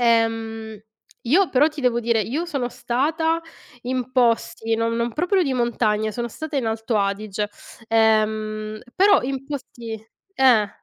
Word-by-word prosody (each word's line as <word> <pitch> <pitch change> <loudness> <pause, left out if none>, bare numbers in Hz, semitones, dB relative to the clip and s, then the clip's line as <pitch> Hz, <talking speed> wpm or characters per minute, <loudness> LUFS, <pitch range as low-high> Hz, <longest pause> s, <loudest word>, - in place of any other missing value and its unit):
Ehm, 225 -2 +1 0.5
io 350 +10 +4
però 285 +4 +4
ti 305 -2 -8
devo 245 -2 +2
dire, 230 -1 +1
io 285 - -2
sono 275 -7 -2
stata 315 +8 0 0.4
in 255 0 -3
posti 230 -2 +1
non 230 0 0
non 235 0 -1
proprio 360 +4 +2
di 275 -4 0
montagna, 220 -3 +1
sono 240 +1 -3
stata 315 +5 -6
in 250 -4 0
Alto 225 0 -1
Adige, 205 +1 -1 0.4
ehm, 215 -1 +1
però 395 +1 +5
in 270 +1 -3
posti 245 -5 -6 0.4
eh. 240 -6 +5
235 Hz, 145 wpm, -22 LUFS, 220-270 Hz, 0.5 s, però